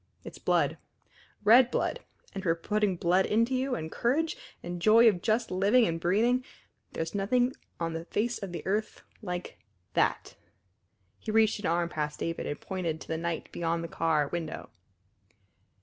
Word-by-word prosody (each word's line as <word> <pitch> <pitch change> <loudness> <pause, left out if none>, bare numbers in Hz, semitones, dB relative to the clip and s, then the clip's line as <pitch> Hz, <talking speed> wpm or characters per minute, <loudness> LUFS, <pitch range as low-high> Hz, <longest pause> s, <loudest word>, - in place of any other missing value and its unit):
It's - - -10
blood - - +1 0.6
red 240 +3 +7
blood. 485 - -1 0.3
And 195 - -4
for 165 -4 +1
putting 210 +3 0
blood 180 +2 +2
into 230 +4 +2
you, 260 0 0
and 160 0 -5
courage, 310 - 0 0.3
and 175 0 -5
joy 225 +4 +7
of 190 -6 +3
just 225 +3 0
living 200 +6 +4
and 165 0 -1
breathing, 225 +9 +2 0.5
there's 165 0 -3
nothing 245 +6 +1 0.3
on 165 -1 -2
the 165 +1 -5
face 230 +6 -1
of 195 -3 -5
the 175 - -6
earth 210 +3 -2 0.2
like 180 -3 -5 0.3
that!" - - 0 0.8
He - - -8
reached 220 0 +3
an 205 - -2
arm 170 +1 +1
past 150 -2 -3
David 165 0 -3
and 145 - -4
pointed 175 -5 -3
to - - -10
the 160 - -2
night 170 -1 -3
beyond 170 0 -1
the - - -4
car 160 -3 +1
window. 165 0 -5
190 Hz, 165 wpm, -29 LUFS, 165-225 Hz, 0.8 s, red